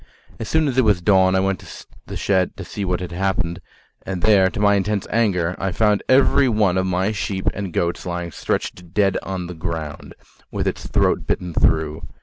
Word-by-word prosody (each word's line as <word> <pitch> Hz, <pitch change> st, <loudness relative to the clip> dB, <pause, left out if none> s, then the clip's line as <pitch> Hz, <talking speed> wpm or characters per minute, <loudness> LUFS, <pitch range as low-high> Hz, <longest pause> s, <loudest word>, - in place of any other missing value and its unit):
As 115 Hz, -, -5 dB
soon 160 Hz, -1 st, +2 dB
as 130 Hz, -1 st, +1 dB
it -, -, +5 dB
was 105 Hz, -5 st, +3 dB
dawn 95 Hz, 0 st, +4 dB
I -, -, +3 dB
went 95 Hz, -1 st, 0 dB
to -, -, -11 dB, 0.2 s
the -, -, -5 dB
shed 95 Hz, -2 st, 0 dB
to -, -, -7 dB
see 100 Hz, -, -5 dB
what 90 Hz, -1 st, -1 dB
had 90 Hz, -1 st, -5 dB
happened, 85 Hz, -2 st, -1 dB, 0.4 s
and 95 Hz, -2 st, -5 dB
there, 95 Hz, -3 st, +5 dB
to 100 Hz, -, -6 dB
my 100 Hz, 0 st, +4 dB
intense 100 Hz, 0 st, 0 dB
anger, 90 Hz, -7 st, +1 dB
I 95 Hz, -, -1 dB
found 105 Hz, +2 st, +2 dB
every 130 Hz, 0 st, +4 dB
one 105 Hz, -5 st, +2 dB
of 95 Hz, 0 st, +1 dB
my 95 Hz, +3 st, 0 dB
sheep 100 Hz, -2 st, -3 dB
and 100 Hz, -2 st, -5 dB
goats 85 Hz, +1 st, -1 dB
lying 85 Hz, -1 st, -4 dB
stretched 90 Hz, +3 st, -4 dB
dead, 100 Hz, -2 st, +3 dB
on 95 Hz, -2 st, -4 dB
the 90 Hz, -, -7 dB
ground 80 Hz, -3 st, -6 dB, 0.3 s
with -, -, -2 dB
its -, -, -3 dB
throat -, -, +1 dB
bitten 90 Hz, -2 st, -2 dB
through. 80 Hz, 0 st, +1 dB
95 Hz, 205 wpm, -21 LUFS, 90-105 Hz, 0.4 s, it